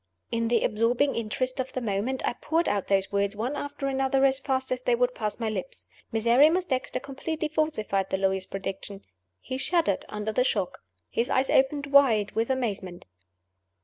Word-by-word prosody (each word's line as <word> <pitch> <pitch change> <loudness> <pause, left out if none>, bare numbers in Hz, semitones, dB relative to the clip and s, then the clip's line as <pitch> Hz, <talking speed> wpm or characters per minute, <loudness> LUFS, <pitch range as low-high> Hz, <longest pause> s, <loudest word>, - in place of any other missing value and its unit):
_" - - -52 0.3
In 230 -1 0
the 235 -1 +2
absorbing 235 +6 +2
interest 255 +4 -2
of 260 0 -3
the - - -1
moment, 230 +3 -2
I - - 0
poured 325 +7 0
out 200 -2 0
those 195 -1 +1
words 200 0 0
one 240 +7 -2
after 285 -1 -5
another 270 0 +2
as 270 0 +3
fast 260 -1 -1
as 255 0 -1
they 245 -1 +2
would 245 +1 +1
pass 215 -1 -3
my 230 - -1
lips. - - -5 0.2
Miserrimus 270 +11 +4
Dexter 265 -4 -2
completely 310 +3 -4
falsified 280 -11 -1
the - - 0
lawyer's 190 -1 0
prediction. 195 0 -6 0.4
He 260 - -5
shuddered 325 - +1
under 210 +1 -3
the 250 +4 +2
shock. 200 -7 -1 0.3
His 235 +3 0
eyes 265 0 +1
opened 280 +2 +3
wide 255 -8 +4
with 225 +2 -1
amazement. 200 -9 -3
250 Hz, 180 wpm, -27 LUFS, 210-270 Hz, 0.4 s, Miserrimus